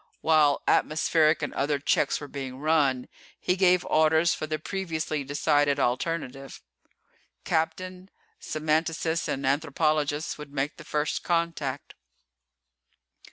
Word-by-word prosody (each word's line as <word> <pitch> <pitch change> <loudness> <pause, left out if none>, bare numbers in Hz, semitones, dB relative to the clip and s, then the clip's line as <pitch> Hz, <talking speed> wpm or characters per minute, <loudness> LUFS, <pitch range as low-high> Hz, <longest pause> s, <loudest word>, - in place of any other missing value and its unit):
While 155 -3 +3
atmospheric 155 0 +2
and 145 - -3
other 145 +1 0
checks 140 0 +1
were 145 - -8
being 135 -2 -6
run, 140 -4 +1 0.3
he 180 - +1
gave 180 -1 +3
orders 160 +2 +3
for 155 - -4
the 155 0 -2
previously 160 -3 -3
decided 145 0 +1
alternative. 135 +1 -2 0.9
Captain, 185 +3 -2 0.3
semanticist 160 +1 -1
and 135 0 -2
anthropologist 150 +1 0
would 150 -1 -9
make 140 +1 -2
the - - -10
First 150 0 -1
Contact. 165 -5 -2
155 Hz, 115 wpm, -27 LUFS, 145-160 Hz, 0.9 s, While